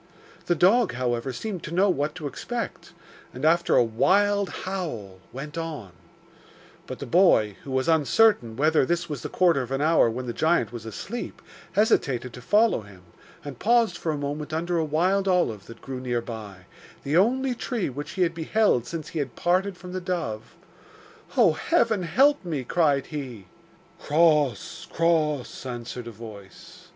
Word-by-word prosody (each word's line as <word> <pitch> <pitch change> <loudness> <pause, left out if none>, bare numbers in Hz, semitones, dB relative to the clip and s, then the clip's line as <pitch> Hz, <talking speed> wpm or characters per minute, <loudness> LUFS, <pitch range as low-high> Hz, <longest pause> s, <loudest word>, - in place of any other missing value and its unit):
The 175 - +2
dog, 195 +6 +4
however, 120 +1 -2
seemed 185 - -5
to - - -7
know 195 +3 +4
what 150 -4 0
to 160 -4 -7
expect, 230 - -5 0.4
and, - - -3
after 170 +2 +3
a - - +6
wild 200 - +2 0.2
howl, 135 - -5
went 150 +5 -6
on; 150 - -6 1.0
but - - -6
the - - -6
boy, 135 - +4
who - - -10
was 130 0 0
uncertain 160 - +3
whether 155 +1 +3
this 175 +5 -1
was 145 -5 -5
the - - -5
quarter 175 -6 +3
of 125 - -6
an 135 0 -1
hour 160 -6 +4
when 125 +3 -4
the 120 - -4
giant 155 -8 +1
was 115 -2 -7
asleep, 225 - -6 0.3
hesitated 135 - +1
to 125 - -10
follow 210 - +3
him, 100 -3 -15 0.4
and 140 -4 -8
paused 230 +1 +3
for 160 - -2
a 150 - -2
moment 145 +2 -4
under 170 +2 -1
a - - +1
wild 180 +6 +1
olive 145 - +1
that 115 - -12
grew 130 -1 -5
near 125 -2 -1
by, 105 -6 -9 0.4
the 140 +3 -1
only 250 +8 +3
tree 240 -3 -3
which 145 +2 -6
he 185 - +1
had 170 -1 0
beheld 165 - +1
since 160 -2 -6
he 165 - -4
had 135 -5 -4
parted 185 +2 0
from 180 0 -10
the 185 - -3
dove. 165 -12 -4 0.8
'Oh, - - +6
heaven, 230 - +1
help 265 - +3
me!' 155 -7 -3
cried 140 -1 +1
he. 130 - -7 0.5
'Cross! 150 - +1
cross!' 155 -5 0
answered 120 -1 -6
a - - -6
voice. 105 -4 -12
155 Hz, 170 wpm, -25 LUFS, 125-180 Hz, 1.0 s, a